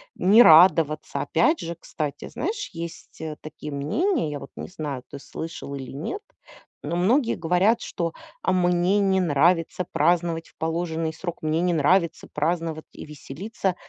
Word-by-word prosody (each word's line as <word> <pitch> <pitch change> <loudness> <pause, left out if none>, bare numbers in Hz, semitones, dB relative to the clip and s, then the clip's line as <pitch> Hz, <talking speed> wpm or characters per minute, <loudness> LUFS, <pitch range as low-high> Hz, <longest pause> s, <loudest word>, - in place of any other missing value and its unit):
не 210 +5 +6
радоваться. 160 -2 +5
Опять 170 - +2
же, 170 +1 -5
кстати, 155 -3 -5
знаешь 410 +5 -3
есть, 165 -1 -8
э, 155 -1 -4
такие 155 -1 -8
мнения, 155 - 0
я 145 - -4
вот - - -10
не - - -6
знаю, 150 -8 -5
ты 140 - -8
слышал 160 -1 -7
или 135 -2 -7
нет, 165 - -5 0.6
но 170 - -3
многие 235 +8 +2
говорят, 180 +7 +2
что- 170 -2 -3 0.3
а 185 - +2
мне 180 +2 +2
не 195 -1 +2
нравится 165 +3 +2
праздновать 165 +1 +1
в - - -30
положенный 160 0 -2
срок, 175 +1 -6
мне 155 +1 +1
не 180 0 +2
нравится 165 +2 +2
праздновать 160 0 -1
и - - -9
веселиться, 175 +6 -4
165 Hz, 155 wpm, -24 LUFS, 155-185 Hz, 0.6 s, не